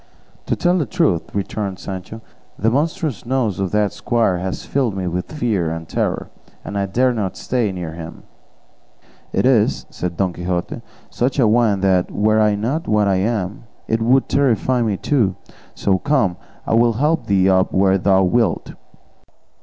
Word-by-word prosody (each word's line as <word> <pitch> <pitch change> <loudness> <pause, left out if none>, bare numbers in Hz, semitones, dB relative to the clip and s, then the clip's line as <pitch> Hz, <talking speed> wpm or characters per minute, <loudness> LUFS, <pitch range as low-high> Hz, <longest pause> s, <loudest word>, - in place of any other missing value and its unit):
"To - - +1
tell 180 +1 +2
the 150 - -1
truth," 165 - 0
returned 100 -1 -3
Sancho, 95 +4 -7 0.4
"the 110 +2 +1
monstrous 150 - -1
nose 120 -7 -1
of 95 -1 -1
that 105 0 +1
squire 115 -7 0
has 95 0 -4
filled 125 -8 -1
me 95 - -2
with 90 0 -3
fear 110 - 0
and 80 0 -5
terror, - - -2 0.3
and 100 - -6
I 100 -1 0
dare 125 +6 +2
not 100 -5 -3
stay 120 -5 -1
near 90 -4 -5
him." 85 0 -9 1.1
"It - - +1
is," 120 -5 +2
said 90 -2 -4
Don 95 -2 0
Quixote, 85 0 -3 0.3
"such 125 +4 -1
a 125 -5 +4
one 110 -3 +3
that 95 -2 +2
were 110 +1 +2
I 105 -1 +3
not 125 +11 -2
what 105 -1 +2
I 95 -1 +2
am 100 0 -2 0.2
it 115 0 0
would 130 +4 +3
terrify 130 -2 +2
me 105 -4 0
too; 110 -9 +1 0.4
so, 95 -2 +1
come, 130 -10 +1 0.3
I - - -1
will 115 +1 +4
help 150 +8 0
thee 95 -2 +3
up 95 -1 +3
where 95 0 +3
thou 95 0 +3
wilt." 100 0 +1
105 Hz, 170 wpm, -19 LUFS, 95-120 Hz, 1.1 s, a